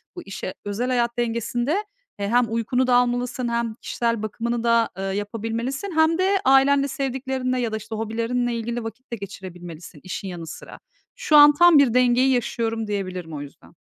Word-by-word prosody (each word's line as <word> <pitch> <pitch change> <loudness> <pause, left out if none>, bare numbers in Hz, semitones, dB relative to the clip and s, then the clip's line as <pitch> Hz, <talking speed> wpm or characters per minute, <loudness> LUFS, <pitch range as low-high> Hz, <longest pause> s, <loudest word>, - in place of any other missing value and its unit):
bu 355 - -6
işe 190 -1 -6
Özel 210 +5 -2
hayat 240 -1 0
dengesinde, 240 - -1 0.4
e, 200 - -1
hem 245 +1 +4
uykunu 245 +3 0
da 245 - +4
almalısın 245 0 0
hem 235 -1 -1
kişisel 230 -2 -1
bakımını 235 +2 -3
da, 230 -1 +3
eee, 195 - -4
yapabilmelisin 225 - -3
hem 320 +1 +4
de 385 +1 +2
ailenle, 275 +1 +5
sevdiklerinle 265 -2 -2
ya 230 -2 -1
da, 220 - -2
işte, 220 +1 -7
hobilerinle 230 +2 -1
ilgili 235 +1 -3
vakit 225 +4 -9
de 235 - -1
geçirebilmelisin 180 -4 -9
işin 185 +1 -5
yanı 170 -3 -7
sıra. 160 - -10 0.4
Şu 475 -11 +1
an 295 0 +9
tam 345 +1 +6
bir 260 -5 +4
dengeyi 250 +1 +4
yaşıyorum, 225 -2 -1
diyebilirim 185 -5 -4
o 145 - -5
yüzden. 145 - -13
235 Hz, 175 wpm, -23 LUFS, 215-255 Hz, 0.4 s, an